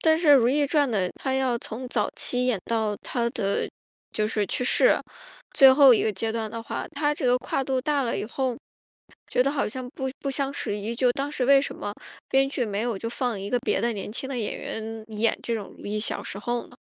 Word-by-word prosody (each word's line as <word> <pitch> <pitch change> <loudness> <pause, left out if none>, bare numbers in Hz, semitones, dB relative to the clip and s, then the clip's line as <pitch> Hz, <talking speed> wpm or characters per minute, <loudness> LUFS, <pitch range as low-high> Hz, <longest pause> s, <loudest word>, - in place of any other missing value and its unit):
但 320 -1 +4
是 325 -1 0
《如 240 -3 +5
懿 290 +2 +2
传》 290 -1 +2
的 185 -4 +1
她 265 -1 -1
要 260 -3 +1
从 250 +3 -7
早 - - 0
期 250 0 0
演 245 -5 +1
到 220 -2 0
她 235 -1 -1
的， 200 -3 -1 0.4
就 215 - 0
是 210 -1 0
去 250 - -2
世。 - - +4 0.5
最 270 -1 +8
后 275 -1 +8
一 - - +2
个 215 - +1
阶 220 +4 -2
段 220 -1 -3
的 230 0 -5
话， - - -4
她 295 +1 +1
这 280 - -2
个 245 0 +5
跨 270 - -2
度 260 -1 0
大 285 +1 +1
了 235 - -1
以 - - -2
后， 255 +1 -2 0.7
觉 250 - +3
得 275 - +1
好 285 -1 0
像 255 +3 -6
不 265 0 -4
不 275 - -2
相 275 0 -1
适 205 -6 -3
宜。 210 +3 -4
就 245 +1 +3
当 275 +2 -3
时 260 - -1
为 275 +1 +6
什 - - -4
么 205 - -5 0.4
编 270 0 +3
剧 265 -3 -1
没 205 -2 -2
有 235 -3 -1
就 230 +4 -4
放 240 -3 -2
一 200 +1 -5
个 245 - +2
别 265 - 0
的 235 0 +1
年 210 0 -6
轻 265 - -4
的 265 -2 -3
演 215 - -2
员 220 0 -6
演 220 +1 +1
这 235 - -3
种 210 -3 -6
如 - - -10
懿 210 +1 -2
小 210 - -2
时 195 - -6
候 240 +3 -2
呢？ - - -17
245 Hz, 265 characters per minute, -25 LUFS, 220-270 Hz, 0.7 s, 最